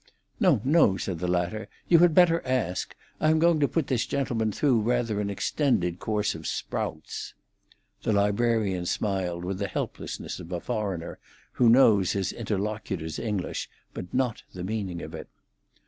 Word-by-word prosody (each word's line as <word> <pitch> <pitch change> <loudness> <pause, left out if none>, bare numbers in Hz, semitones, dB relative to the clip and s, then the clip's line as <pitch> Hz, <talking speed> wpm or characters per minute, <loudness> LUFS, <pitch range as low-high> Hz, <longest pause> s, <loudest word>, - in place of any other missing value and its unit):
"No, 175 - +4
no!" 135 - +4
said 90 -4 -3
the 90 - -2
latter; 90 +5 -1 0.2
"you 170 - +6
had 170 -2 +5
better 170 -2 +5
ask. 125 -9 -1 0.2
I 155 - +3
am 160 - +4
going 165 0 +4
to 145 - +3
put 165 0 0
this 125 -3 0
gentleman 120 -6 0
through 125 0 +2
rather 115 -2 0
an 100 - -2
extended 95 - 0
course 105 -1 0
of - - -7
sprouts." - - -4 0.7
The - - 0
librarian 100 -3 +1
smiled 90 -5 -1
with 95 +1 -3
the 100 - -1
helplessness - - -5
of 85 - -9
a 90 - -2
foreigner, 100 -6 -3 0.3
who 120 - +4
knows 110 -6 +5
his 95 -1 -1
interlocutor's 100 -6 -3
English, 105 -5 -3 0.2
but 90 - -7
not 125 -3 0
the 90 - -5
meaning 95 -4 -3
of 80 - -8
it. 80 - -7
105 Hz, 165 wpm, -27 LUFS, 95-125 Hz, 0.7 s, you